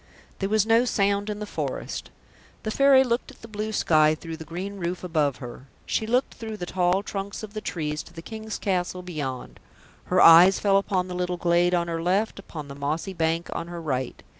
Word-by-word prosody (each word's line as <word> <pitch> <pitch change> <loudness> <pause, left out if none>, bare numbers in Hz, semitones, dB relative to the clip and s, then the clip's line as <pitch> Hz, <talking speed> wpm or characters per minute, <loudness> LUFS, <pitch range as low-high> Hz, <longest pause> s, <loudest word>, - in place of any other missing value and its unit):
There 195 - -1
was 215 -1 +3
no 225 +2 +4
sound 200 -3 +1
in 210 - -3
the 210 - -5
forest. - - -4 0.5
The 215 - -2
Fairy 275 +1 +6
looked 240 -1 -1
at - - -16
the - - -8
blue 215 0 -4
sky 155 -6 +3
through 165 0 -8
the 160 - -8
green 180 +5 -6
roof 180 0 -3
above 155 -6 +1
her; 125 +1 -10 0.2
she 220 - -1
looked 250 +3 +1
through 220 -2 -7
the 175 - -4
tall 180 +2 +1
trunks 200 +1 -5
of 210 -1 -8
the 215 - -4
trees 150 -5 -3
to 170 - -15
the 165 -1 -9
King's 220 +1 -6
castle 180 -1 -2
beyond; 145 -8 -5 0.5
her - - +1
eyes 175 +4 +8
fell 195 -1 +3
upon 190 -2 0
the 180 - -6
little 180 0 -2
glade 175 +1 +2
on 170 -1 0
her 165 -1 -3
left, 195 +5 0
upon 155 -6 -8
the 140 - -8
mossy 150 +7 -3
bank 165 0 0
on 170 - -4
her 175 0 -6
right 130 -6 -3
180 Hz, 215 wpm, -25 LUFS, 165-205 Hz, 0.5 s, eyes